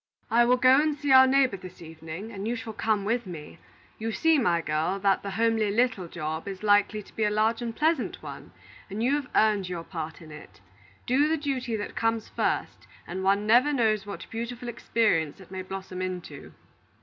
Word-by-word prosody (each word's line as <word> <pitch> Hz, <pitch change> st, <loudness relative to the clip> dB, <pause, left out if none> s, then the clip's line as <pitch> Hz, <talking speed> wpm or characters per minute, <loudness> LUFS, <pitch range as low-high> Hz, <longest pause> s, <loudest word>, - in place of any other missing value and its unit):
"I 235 Hz, +1 st, +5 dB
will 250 Hz, +1 st, +4 dB
go 255 Hz, +3 st, +6 dB
and 305 Hz, -1 st, 0 dB
see 290 Hz, -1 st, -1 dB
our 260 Hz, 0 st, +8 dB
neighbor 260 Hz, -5 st, +3 dB
this 185 Hz, 0 st, -12 dB
evening, 160 Hz, +5 st, -8 dB
and 200 Hz, 0 st, -5 dB
you 240 Hz, -, -1 dB
shall 225 Hz, -1 st, -6 dB
come 215 Hz, -2 st, 0 dB
with 230 Hz, 0 st, -1 dB
me. 160 Hz, -4 st, -9 dB, 0.4 s
You 225 Hz, +1 st, -2 dB
see, 325 Hz, +5 st, +3 dB
my 175 Hz, -8 st, +2 dB
girl, 160 Hz, +4 st, -1 dB
that 195 Hz, 0 st, +2 dB
the 200 Hz, -, -5 dB
homely 225 Hz, 0 st, +1 dB
'little 225 Hz, -4 st, +1 dB
job' 160 Hz, +1 st, -5 dB
is 195 Hz, 0 st, -6 dB
likely 205 Hz, 0 st, +3 dB
to -, -, -20 dB
be 220 Hz, -, 0 dB
a 210 Hz, -, +3 dB
large 220 Hz, +3 st, +1 dB
and 230 Hz, -1 st, -4 dB
pleasant 310 Hz, -3 st, 0 dB
one, -, -, -9 dB, 0.4 s
and 210 Hz, +4 st, -3 dB
you 260 Hz, +3 st, +2 dB
have 290 Hz, -3 st, -1 dB
earned 210 Hz, -4 st, +3 dB
your 170 Hz, -2 st, -4 dB
part 160 Hz, -3 st, -6 dB
in 160 Hz, -2 st, -13 dB
it. 100 Hz, -, -13 dB, 0.5 s
Do 275 Hz, +4 st, +3 dB
the 320 Hz, +1 st, +1 dB
duty 265 Hz, -5 st, -2 dB
that 205 Hz, -1 st, -5 dB
comes 225 Hz, -1 st, 0 dB
first, -, -, -2 dB, 0.2 s
and 185 Hz, +2 st, -5 dB
one 200 Hz, +2 st, +2 dB
never 245 Hz, +7 st, +5 dB
knows 215 Hz, -7 st, +1 dB
what 200 Hz, -, -7 dB
beautiful 235 Hz, +2 st, -5 dB
experience 210 Hz, -10 st, 0 dB
it 190 Hz, -1 st, -15 dB
may 190 Hz, -1 st, -4 dB
blossom 190 Hz, 0 st, -7 dB
into. 180 Hz, -6 st, -6 dB
215 Hz, 205 wpm, -27 LUFS, 185-240 Hz, 0.5 s, our